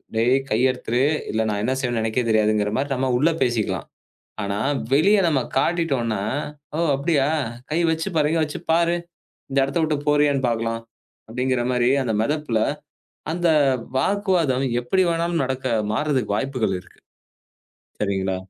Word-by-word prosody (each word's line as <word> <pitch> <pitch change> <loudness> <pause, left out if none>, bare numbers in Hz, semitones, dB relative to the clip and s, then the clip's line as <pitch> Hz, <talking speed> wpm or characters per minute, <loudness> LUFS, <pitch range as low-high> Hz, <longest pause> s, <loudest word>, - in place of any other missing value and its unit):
"டேய், 120 +4 +3
கைய 125 +4 +3
எடுத்துரு, 125 +1 -1 0.3
இல்லனா 110 0 0
நான் 105 0 -2
என்ன 130 +2 0
செய்வேனோ 120 -3 -1
எனக்கே 115 +2 0
தெரியாது"ங்குற 105 -1 +2
மாதிரி 140 +1 -1
நாம 130 0 0
உள்ளே 165 +4 +3
பேசிக்கலாம். 120 -4 -1 0.6
ஆனா, 100 0 -2 0.4
வெளிய 200 +8 +4
நாம 145 -4 +2 0.2
காட்டிட்டோன்னா, 135 - 0 0.5
"ஓ, - - -2 0.2
அப்படியா, 140 -1 +1 0.4
கை 160 +3 +1
வச்சு, 160 +3 -1
பாரு 150 0 +2
வச்சு 150 -1 -3
பாரு. 170 +1 +3 0.5
இந்த 135 - 0
இடத்தை 140 +5 -1
விட்டுப் 150 -1 -2
போறியான்னு 145 -3 +3
பாக்கலாம்" 115 0 -2 0.5
அப்படிங்கிற 125 +1 0
மாதிரி 125 0 +2
அந்த 115 - -1
மெதப்புல 150 -3 -1 0.7
அந்த 175 +1 0 0.5
வாக்குவாதம் 170 -7 +1 0.2
எப்படி 190 +10 +1
வேணாலும் 170 -2 0
நடக்க, 130 0 -2 0.2
மாறுறதுக்கு 130 -4 0
வாய்ப்புகள் 125 -8 -1
இருக்கு. 90 - -20 1.0
சரிங்களா? 95 -2 -1
130 Hz, 135 wpm, -22 LUFS, 115-155 Hz, 1.0 s, வெளிய